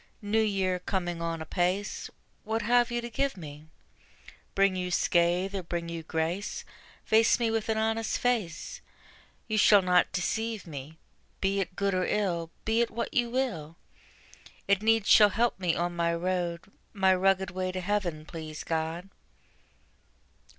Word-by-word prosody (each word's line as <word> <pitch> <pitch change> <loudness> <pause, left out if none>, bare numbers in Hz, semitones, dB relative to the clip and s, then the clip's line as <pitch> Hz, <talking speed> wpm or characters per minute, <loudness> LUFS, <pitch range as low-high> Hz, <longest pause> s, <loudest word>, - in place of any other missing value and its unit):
New 215 +2 +2
Year 190 -4 0
coming 175 -2 -3
on 165 -1 -3
apace 180 +5 -1 0.3
What 220 +1 -2
have 240 +2 +3
you 240 0 -2
to 235 - -6
give 275 -1 -1
me? 150 -2 -10 0.9
Bring 195 -1 +3
you 180 0 -2
scathe, 175 +2 +2
or 195 - -2
bring 170 -1 -4
you 170 -1 -5
grace, 160 +5 -3 0.4
Face 220 +2 +4
me 230 -2 +1
with 225 0 -1
an 220 - +1
honest 225 0 0
face; 245 - -2 0.7
You 215 -1 0
shall 205 -2 +6
not 180 -1 +3
deceive 220 +3 -2
me: 150 -1 -8 0.4
Be 195 +1 0
it 185 -1 -3
good 200 +1 0
or 185 -1 +1
ill, 175 -6 -1 0.2
be 225 +1 +2
it 235 - +1
what 235 - -4
you 240 -4 +1
will, 200 - -2 0.9
It 200 0 +3
needs 225 -1 +3
shall 210 -1 +8
help 225 +1 0
me 175 -3 +1
on 175 0 -1
my 170 0 +1
road, 175 -1 -1 0.3
My 190 -2 +4
rugged 190 0 +2
way 185 0 -2
to 185 - -4
heaven, 180 -5 -2
please 155 -2 -7
God. 165 +3 -3
185 Hz, 155 wpm, -28 LUFS, 170-220 Hz, 0.9 s, shall